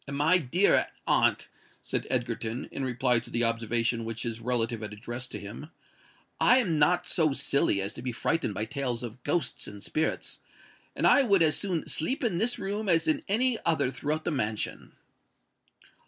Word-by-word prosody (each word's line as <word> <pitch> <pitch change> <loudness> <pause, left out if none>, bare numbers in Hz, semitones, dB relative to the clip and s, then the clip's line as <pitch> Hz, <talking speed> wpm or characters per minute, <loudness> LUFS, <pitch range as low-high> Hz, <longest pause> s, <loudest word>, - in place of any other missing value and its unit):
"My 150 +6 +3
dear 175 +7 +2 0.2
aunt," - - +2 0.3
said - - -3
Egerton, 120 -1 -2
in 135 - -4
reply 125 -1 +2
to 115 - -8
the 120 - 0
observation 115 0 +1
which 115 0 -4
his 115 -1 -3
relative 115 -1 -1
had 105 -1 -6
addressed 120 +4 -6
to - - -4
him, 110 +10 -9 0.7
"I 250 - +6
am 175 -12 +1
not 175 +4 +3
so 160 -6 +2
silly 140 -6 +1
as 100 - -3
to - - -8
be 125 0 -3
frightened 120 -2 -1
by 110 - -2
tales 125 -1 -3
of 120 +1 -8
ghosts 145 -2 -1
and 105 -1 -9
spirits; 160 +1 -2 0.6
and - - 0
I - - +7
would 200 -9 +4
as 155 -2 +3
soon 180 -5 -2
sleep 160 - -2
in 185 -8 0
this 235 +4 +1
room 205 +1 -3
as 165 -2 +3
in 155 - +2
any 235 +4 +1
other 155 -6 +1
throughout 155 +3 -2
the - - 0
mansion." 110 -7 -3
135 Hz, 180 wpm, -28 LUFS, 115-170 Hz, 0.7 s, I